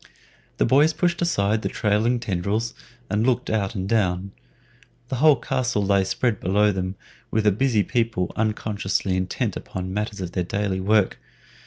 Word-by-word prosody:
The - - +3
boys 150 +4 +4
pushed 175 +2 0
aside 110 -11 +1
the - - -2
trailing 110 +4 +1
tendrils 105 +2 -2 0.3
and 105 +1 0
looked 125 0 +1
out 105 -1 -1
and 95 -1 -3
down. 95 -3 0 0.8
The 130 - -2
whole 150 +2 +6
castle 125 -5 -1
lay 100 0 +3
spread 110 +4 0
below 105 +3 +2
them, 95 0 -3 0.3
with 110 - +1
the 105 - +5
busy 110 0 +2
people 115 -7 -1
unconsciously 105 -3 -1
intent 95 0 -1
upon 95 - -5
the 95 0 -5
matters 105 0 -3
of 90 -2 -4
their 90 0 -1
daily 95 +1 -2
work. 105 +1 +2
105 Hz, 165 wpm, -23 LUFS, 95-115 Hz, 0.8 s, whole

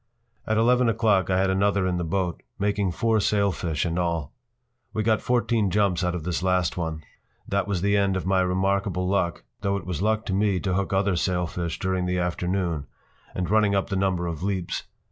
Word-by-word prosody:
p> - - -2
At 110 - +3
eleven 120 +1 +4
o’clock 105 -5 +2
I 95 - +2
had 95 0 +2
another 100 0 +2
in 90 -1 0
the 85 - -1
boat, 90 +1 -1 0.2
making 100 -1 0
four 110 +4 +1
sailfish 95 -7 0
in 85 +1 -1
all. 85 -4 -1 0.6
We 110 - -1
got 110 0 +2
fourteen 120 -4 +1
jumps 95 -2 +1
out 90 0 0
of 85 - -4
this 90 +1 -2
last 90 -2 +1
one. 80 -3 -3 0.4
That 100 +1 0
was 95 -4 -1
the 100 0 +3
end 100 -1 +2
of 95 - -4
my 95 0 +3
remarkable 95 0 0
luck, 95 -3 0 0.2
though 100 0 0
it 95 - -7
was 90 -2 -3
luck 110 +1 +1
to 95 - -2
me 100 -1 +2
to 95 -3 -1
hook 95 +1 -1
other 95 -1 +2
sailfish 85 -1 -1
during 95 -1 -1
the 90 0 0
afternoon, 90 -2 -1 0.5
and 90 -1 -1
running 105 +1 +3
up 95 - 0
the - - 0
number 95 -2 0
of 85 -3 -4
leaps. 95 -2 -2
95 Hz, 205 wpm, -25 LUFS, 90-100 Hz, 0.6 s, eleven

